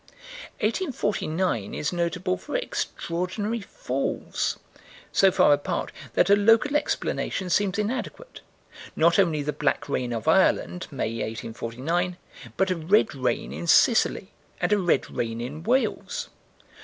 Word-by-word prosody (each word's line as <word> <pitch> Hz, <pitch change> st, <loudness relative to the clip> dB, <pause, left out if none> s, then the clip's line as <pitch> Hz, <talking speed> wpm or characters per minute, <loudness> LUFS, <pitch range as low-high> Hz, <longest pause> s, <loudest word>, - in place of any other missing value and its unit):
1849 200 Hz, -, -1 dB
is 150 Hz, -, -2 dB
notable 180 Hz, +2 st, -1 dB
for -, -, -7 dB
extraordinary 205 Hz, -, -2 dB
falls, -, -, -3 dB, 0.5 s
so 195 Hz, -, +5 dB
far 145 Hz, -, +5 dB
apart 145 Hz, 0 st, -2 dB, 0.2 s
that -, -, +3 dB
a -, -, +9 dB
local 225 Hz, +8 st, +4 dB
explanation 190 Hz, -9 st, -1 dB
seems 200 Hz, 0 st, +2 dB
inadequate 255 Hz, -, -4 dB, 0.5 s
not 170 Hz, +3 st, +4 dB
only 160 Hz, -6 st, +2 dB
the 150 Hz, +1 st, -2 dB
black 150 Hz, -1 st, 0 dB
rain 125 Hz, -1 st, -2 dB
of 115 Hz, +4 st, -4 dB
Ireland, 180 Hz, +1 st, +2 dB
May, 115 Hz, -6 st, -3 dB
1849, 130 Hz, +11 st, -3 dB, 0.4 s
but 190 Hz, -1 st, +2 dB
a -, -, +1 dB
red 185 Hz, +7 st, +2 dB
rain 125 Hz, -3 st, -2 dB
in 170 Hz, -, -5 dB
Sicily 210 Hz, 0 st, +4 dB, 0.3 s
and -, -, +1 dB
a 205 Hz, -, +3 dB
red 175 Hz, -7 st, +1 dB
rain 115 Hz, -1 st, -3 dB
in 135 Hz, +6 st, -5 dB
Wales. 265 Hz, -, -1 dB
180 Hz, 130 wpm, -25 LUFS, 150-210 Hz, 0.5 s, a